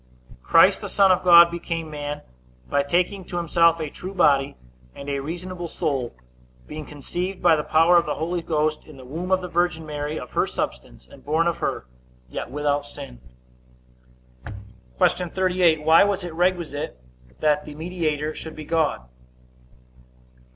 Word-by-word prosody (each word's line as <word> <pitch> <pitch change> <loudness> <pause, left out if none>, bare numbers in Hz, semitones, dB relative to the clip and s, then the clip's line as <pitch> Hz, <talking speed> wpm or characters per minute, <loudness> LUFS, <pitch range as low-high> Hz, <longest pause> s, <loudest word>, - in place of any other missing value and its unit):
Christ - - +5
the - - -6
Son 195 -1 +4
of 185 0 +2
God 170 -1 +8
became 165 -2 -4
man, 145 0 -5 0.5
by 145 - +1
taking 180 +6 0
to 175 - -5
himself 170 0 +3
a 155 -2 -4
true 190 +2 -8
body, 140 -5 +3 0.4
and 140 - -9
a 140 -1 -2
reasonable 175 +3 -6
soul, 140 -8 -3 0.5
being 155 -1 -8
conceived 175 +6 -5
by 160 - +6
the 150 - -2
power 165 +3 +4
of 170 - +2
the - - -1
Holy 170 +2 -2
Ghost 155 -2 -1
in 155 -3 -14
the 130 - -12
womb 165 +8 -5
of 185 0 +3
the 180 - -5
virgin 175 -2 0
Mary, 150 0 -4
of 125 - -10
her - - +1
substance, - - -5
and - - -16
born 160 +3 +1
of 170 -1 0
her, - - -3 0.4
yet - - -6
without 145 0 -1
sin. 140 - -10 1.8
Q. 180 - +1
38. 180 -4 +2
Why 160 +3 +6
was 200 -2 0
it 175 -2 -6
requisite 170 - -1 0.4
that 150 -1 +1
the 150 - -9
mediator 155 -2 -2
should 160 0 -8
be 155 - -8
God? 160 - 0
160 Hz, 165 wpm, -23 LUFS, 150-175 Hz, 1.8 s, God